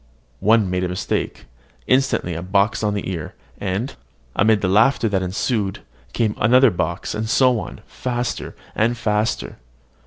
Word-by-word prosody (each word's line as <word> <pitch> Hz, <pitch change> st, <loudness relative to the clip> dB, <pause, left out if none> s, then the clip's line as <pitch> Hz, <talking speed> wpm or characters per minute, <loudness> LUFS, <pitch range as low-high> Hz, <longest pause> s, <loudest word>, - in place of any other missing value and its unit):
One 110 Hz, -1 st, +4 dB
made 90 Hz, 0 st, -1 dB
a 90 Hz, -, -1 dB
mistake, 90 Hz, -, -3 dB, 0.4 s
instantly 130 Hz, -9 st, +1 dB
a 85 Hz, -, -4 dB
box 100 Hz, +4 st, +1 dB
on 105 Hz, -1 st, 0 dB
the 100 Hz, -, -3 dB
ear; 85 Hz, -4 st, -5 dB, 0.2 s
and, 100 Hz, +7 st, -2 dB, 0.4 s
amid 110 Hz, 0 st, +3 dB
the 95 Hz, -, +1 dB
laughter 115 Hz, +5 st, +4 dB
that 100 Hz, -3 st, 0 dB
ensued, 95 Hz, +2 st, -1 dB, 0.3 s
came 110 Hz, -3 st, 0 dB
another 125 Hz, +1 st, +5 dB
box; 85 Hz, -1 st, -2 dB
and 110 Hz, +1 st, -3 dB
so 125 Hz, -1 st, +4 dB
on, -, -, -8 dB
faster 120 Hz, -1 st, -4 dB, 0.2 s
and 115 Hz, +2 st, +1 dB
faster. 105 Hz, -1 st, -1 dB
105 Hz, 150 wpm, -21 LUFS, 95-120 Hz, 0.4 s, another